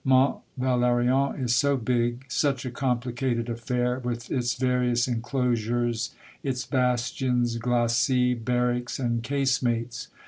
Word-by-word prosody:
Mont 130 -1 +3 0.2
Valerien 125 +1 +2
is 125 -3 +1
so 140 +3 +3
big, 120 +1 0
such 135 +1 0
a 125 - -3
complicated 125 -1 -1
affair, 125 +1 -1
with 120 -1 -4
its 120 -3 0
various 125 -1 +1
enclosures, 120 -1 -1 0.3
its 130 -2 -2
bastions, 125 -1 0
glacis, 120 +1 +2
barracks, 125 +1 0
and 120 -3 -1
casemates 125 -3 -1
125 Hz, 110 wpm, -26 LUFS, 120-130 Hz, 0.3 s, Mont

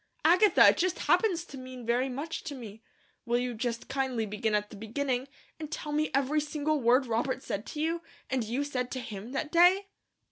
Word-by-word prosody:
"Agatha, 360 +4 +7
it - - +2
just 370 -1 +1
happens 360 -7 +2
to 275 -5 -10
mean 255 -1 -9
very 245 +3 +1
much 290 +6 -5
to 295 -3 -5
me. 220 -4 -9 0.4
Will 240 0 +1
you 245 0 -1
just 230 +1 -3
kindly 265 -4 -1
begin 210 +1 -1
at 210 0 -1
the - - -9
beginning, 250 +5 -2 0.3
and 310 -1 -6
tell 300 -2 -4
me 305 +1 +1
every 280 +3 +1
single 300 0 -1
word 250 +3 +4
Robert 245 +3 -1
said 200 +2 -4
to 300 - -6
you, 330 +2 0 0.3
and 260 -2 0
you 240 +6 -1
said 250 -4 -2
to 260 - -4
him, 225 -1 -7
that 295 +2 -2
day?" 365 +4 +5
265 Hz, 205 wpm, -29 LUFS, 235-305 Hz, 0.4 s, Agatha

